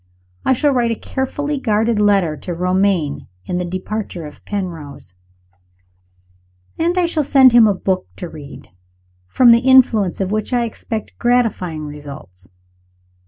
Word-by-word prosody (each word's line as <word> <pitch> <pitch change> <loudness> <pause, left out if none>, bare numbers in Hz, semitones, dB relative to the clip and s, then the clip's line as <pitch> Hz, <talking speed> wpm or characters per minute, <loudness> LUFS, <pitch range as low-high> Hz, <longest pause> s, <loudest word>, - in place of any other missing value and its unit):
I - - +3
shall 290 +3 +1
write 245 -3 +1
a 230 - -1
carefully 285 +4 -3
guarded 220 -2 +1
letter 195 -6 +2
to 175 +3 -6
Romayne, 180 -4 0 0.2
on 180 - -2
the - - -2
departure 185 -1 -5
of 150 - -12
Penrose; 165 - -6 1.7
and 340 +3 0
I 360 - +3
shall 330 -3 -1
send 265 -2 +6
him 235 -2 +6
a 205 - +1
book 185 0 -2
to 175 - -7
read, 145 - -12 0.6
from 240 - +5
the 230 - +6
influence 245 -7 +3
of 195 0 -2
which 215 +3 -2
I 240 -1 +2
expect 220 -1 -6
gratifying 220 -10 0
results. 140 -12 -10
205 Hz, 145 wpm, -18 LUFS, 170-245 Hz, 1.7 s, send